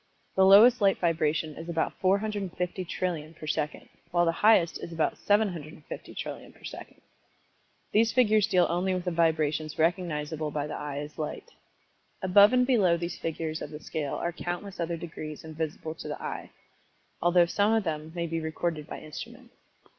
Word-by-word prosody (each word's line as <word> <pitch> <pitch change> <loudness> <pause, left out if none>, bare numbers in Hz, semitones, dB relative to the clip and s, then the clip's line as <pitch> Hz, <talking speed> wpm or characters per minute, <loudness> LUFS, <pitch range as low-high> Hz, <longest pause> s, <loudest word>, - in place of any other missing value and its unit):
The 190 - +5
lowest 225 +5 +8
light 195 -1 +4
vibration 160 -2 0
is 165 +1 -8
about 165 -1 0
450,000,000,000,000 185 -4 -1
per 155 - -9
second, 150 0 -2 0.2
while 175 0 +2
the 165 - +3
highest 175 -1 +3
is - - -7
about 165 -1 0
750,000,000,000,000 175 -8 -3
per - - -21
second. - - -9 0.9
These 225 +2 +4
figures 215 -4 +4
deal 180 -4 +4
only 185 +2 0
with 180 0 -4
the 180 - 0
vibrations 155 -2 +1
recognizable 160 -2 0
by 145 -1 -2
the 150 - -6
eye 145 -1 -5
as 150 +2 -7
light. 155 - -5 0.7
Above 200 +3 +7
and 250 0 +4
below 200 -10 +3
these 170 +1 -5
figures 160 -1 -3
of - - -5
the 150 0 -8
scale 150 -2 -3
are 170 - -2
countless 175 +3 -5
other 170 0 -1
degrees 155 -2 -7
invisible 160 0 -4
to 160 - -9
the 150 - -5
eye, - - -5 0.7
although 175 0 +5
some 205 +5 +2
of 225 -1 +3
them 155 -2 -4
may 170 -1 -1
be 165 0 -2
recorded 160 -1 -3
by - - -7
instruments. 235 - -10
170 Hz, 165 wpm, -28 LUFS, 155-190 Hz, 0.9 s, lowest